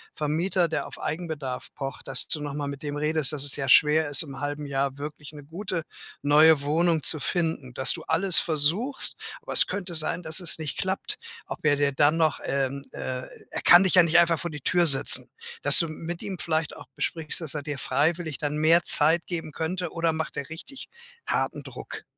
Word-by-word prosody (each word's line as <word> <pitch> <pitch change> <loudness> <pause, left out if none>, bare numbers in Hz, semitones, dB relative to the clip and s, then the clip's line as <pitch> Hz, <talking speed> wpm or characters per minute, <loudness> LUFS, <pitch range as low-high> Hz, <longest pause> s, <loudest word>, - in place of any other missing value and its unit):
Vermieter, 170 +4 -1
der 160 - -4
auf - - -12
Eigenbedarf 150 -6 -6
pocht 135 -2 -8
dass - - +3
du 150 - +2
noch 145 -1 -6
mal 145 -1 -4
mit 140 -1 -8
dem 145 -1 -6
redest, 150 -2 +2
dass 145 -2 +1
es 145 - +4
sehr 140 -1 +1
schwer 150 +2 +4
ist, 145 +3 +7
im 135 -3 -11
1/2 145 +1 -5
Jahr 140 -1 -3
wirklich 150 0 -9
'ne 145 -1 -12
gute 170 +2 -6 0.4
neue 150 +1 +4
Wohnung 160 +2 0
zu 155 - +2
finden. 160 -6 -3
Dass 130 +1 +3
du - - -10
alles 180 +2 +5
versuchst, 170 - 0 0.3
aber 480 - -8
es - - +6
könnte 185 -3 -6
sein, 165 +2 -2
dass 160 +2 +3
es 175 - +4
nicht 155 -3 -6
klappt. 195 - -3 0.3
Ob - - -8
er 145 -1 +3
dir 145 0 0
dann 145 +3 +2
noch, 155 -3 0
ähm, 140 0 -3
äh 130 0 -6 0.2
er - - -6
kann 175 +2 +7
dich 190 - +1
ja 180 - +7
nicht 170 +1 +2
einfach 170 -1 +3
vor 175 - -5
die 150 -2 -9
Tür 175 +2 +2
setzen. 135 -2 +4 0.3
Dass - - +5
du 170 - +4
m 155 - -10
mit 170 0 -6
ihm 190 -3 -6
vielleicht 160 -1 -2
auch - - -13
besprichst, 160 0 -3
dass 160 -4 -4
er 150 - -5
dir 145 -1 -6
freiwillig 160 +2 -2
dann 150 0 -3
mehr 165 +3 +4
Zeit 160 +3 +6
geben 165 -3 -4
könnte, 170 +3 -5
oder 165 -1 -1
macht 160 0 -5
der 140 - -5
richtig 220 - -10 0.4
harten - - -2
Druck? - - -10
155 Hz, 215 wpm, -24 LUFS, 145-170 Hz, 0.4 s, ist